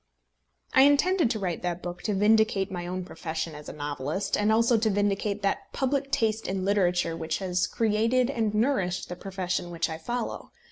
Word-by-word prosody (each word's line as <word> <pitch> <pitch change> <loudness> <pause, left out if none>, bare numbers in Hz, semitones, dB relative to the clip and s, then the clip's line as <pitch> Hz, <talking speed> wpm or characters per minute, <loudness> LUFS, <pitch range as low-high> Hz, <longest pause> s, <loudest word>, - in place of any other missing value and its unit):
I 265 - +7
intended 290 +2 +4
to 225 - -1
write 180 -5 -3
that 175 0 -3
book 175 0 -6
to 210 - -1
vindicate 210 -1 +3
my 175 -2 -4
own 185 0 -4
profession 165 -2 -4
as 150 0 -9
a - - -5
novelist, 145 +5 -2
and 210 +1 +2
also 230 +2 +4
to 220 0 +2
vindicate 205 0 0
that 195 - -1
public 275 +1 0
taste 225 -4 0
in 190 0 -2
literature 180 -4 +1
which 160 -1 -2
has 185 -1 0
created 230 +4 +1
and 225 -5 0
nourished 210 -7 0
the 180 - -4
profession 185 -2 -3
which 170 -1 -2
I 160 - -5
follow. 240 +7 -4
195 Hz, 185 wpm, -27 LUFS, 175-225 Hz, -, I